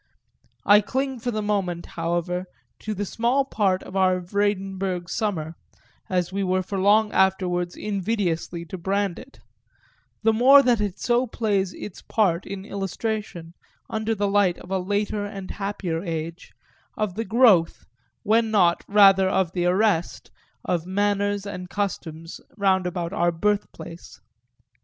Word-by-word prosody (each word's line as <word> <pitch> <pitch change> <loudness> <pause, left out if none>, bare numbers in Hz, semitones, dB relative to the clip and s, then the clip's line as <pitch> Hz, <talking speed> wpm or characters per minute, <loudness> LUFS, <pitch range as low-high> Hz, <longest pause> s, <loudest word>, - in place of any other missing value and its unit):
I 205 +1 +7
cling 265 +5 -2
for 245 - -3
the 215 -2 -2
moment, 190 -5 -1
however, 175 +2 -2 0.3
to 215 -1 -4
the 205 +1 -2
small 245 +7 0
story 195 -4 +2
of 185 - -10
our 185 -1 +3
Vredenburg 190 -1 -2
summer, 165 -7 -2 0.6
as 180 -1 -1
we 200 - -1
were 185 0 +1
for 195 +1 -4
long 210 +2 +4
afterwards 180 -2 +1
invidiously 185 -5 -2
to 185 - -6
brand 195 0 -1
it; 270 - -15 0.8
the 225 0 +4
more 270 +5 +7
that 240 -4 +2
it 205 -2 -2
so 245 +1 +1
plays 200 -5 -1
its 205 - -8
part 190 -6 0
in 195 0 -6
illustration, 200 -3 -4 0.4
under 220 +1 -1
the 205 0 0
light 200 -3 +2
of 180 - -12
a 190 - +1
later 205 +2 -1
and 200 -2 -6
happier 195 -5 -3
age, 165 -1 -5 0.5
of 215 -4 -1
the 225 +4 -3
growth, 220 -8 +3 0.4
when 225 +2 +2
not 180 -5 +3
rather 195 -2 +6
of 190 -3 +1
the 175 -1 0
arrest, 185 -2 0 0.3
of 175 -1 -1
manners 205 +1 0
and 180 -3 -6
customs 165 -5 -4 0.2
roundabout 185 -3 0
our 175 -4 +2
birthplace. 175 -2 -3
195 Hz, 145 wpm, -24 LUFS, 180-210 Hz, 0.8 s, I